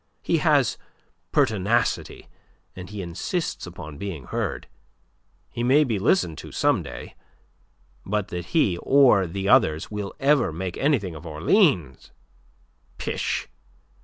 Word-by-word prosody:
He - - +1
has - - +2 0.5
pertinacity, 110 +3 0 0.5
and 90 0 -9
he 105 -2 -6
insists 90 - -3
upon 75 -4 -9
being 95 -9 -5
heard. - - -3 0.9
He 120 - -5
may 135 +5 +4
be 115 -8 -1
listened 95 - +1
to - - -10
some - - +2
day. - - -9 0.9
But 105 0 -2
that 90 -1 -5
he, 95 - +1
or 130 -9 +4
the 95 +3 -4
others, 100 -11 +3
will 105 -2 -5
ever 140 - +3
make 90 +3 -5
anything 130 - 0
of 80 +2 -10
Orleans... 80 - +1 0.9
pish! - - -2
100 Hz, 125 wpm, -24 LUFS, 85-125 Hz, 0.9 s, may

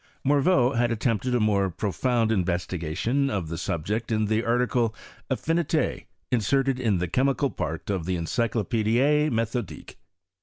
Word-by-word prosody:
Morveau 140 -2 +3
had 120 0 +2
attempted 115 +1 0
a - - +2
more 100 -3 +2
profound 110 +5 0
in 110 - +2
I - - -4
vestigation 90 - -1
of 95 -10 -3
the 85 - -4
subject 105 +8 -2
in 110 -1 +1
the 110 +2 0
article 120 -1 +1 0.3
Affiniti, 160 +3 0 0.3
inserted 130 +3 +1
in 110 -6 +1
the 90 +1 -1
chemical 135 - +1
part 80 -2 -4
of 95 -5 -2
the 95 - 0
Encyclopedie 115 - +1
Metbodique. 115 - -3
115 Hz, 145 wpm, -26 LUFS, 95-130 Hz, 0.3 s, Morveau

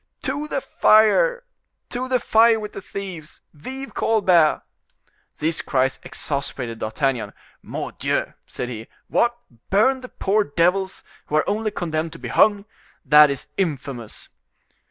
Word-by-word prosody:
"To 295 +1 -2
the 275 - -2
fire! 485 - +4 0.5
to 250 +1 -3
the 255 -1 +1
fire 225 0 +4
with 210 -1 -7
the - - -7
thieves! 185 -5 -8
Vive 265 - -8
Colbert!" 185 -8 +3 0.7
These 160 +2 -1
cries 135 -1 0
exasperated 130 -5 -3
D'Artagnan. 115 -1 -1 0.3
"Mordioux!" - - -3
said 125 - -5
he. 115 -2 -7 0.2
"What! 240 0 +2 0.3
burn 260 +7 +3
the 255 - -9
poor 205 +2 +1
devils 180 +4 0 0.2
who 150 - -2
are 155 - +2
only 215 +1 0
condemned 160 -4 -3
to - - -10
be - - -7
hung? 205 -1 +3 0.4
that 150 0 +7
is 140 -2 -4
infamous!" 140 - -4
180 Hz, 135 wpm, -22 LUFS, 145-220 Hz, 0.7 s, that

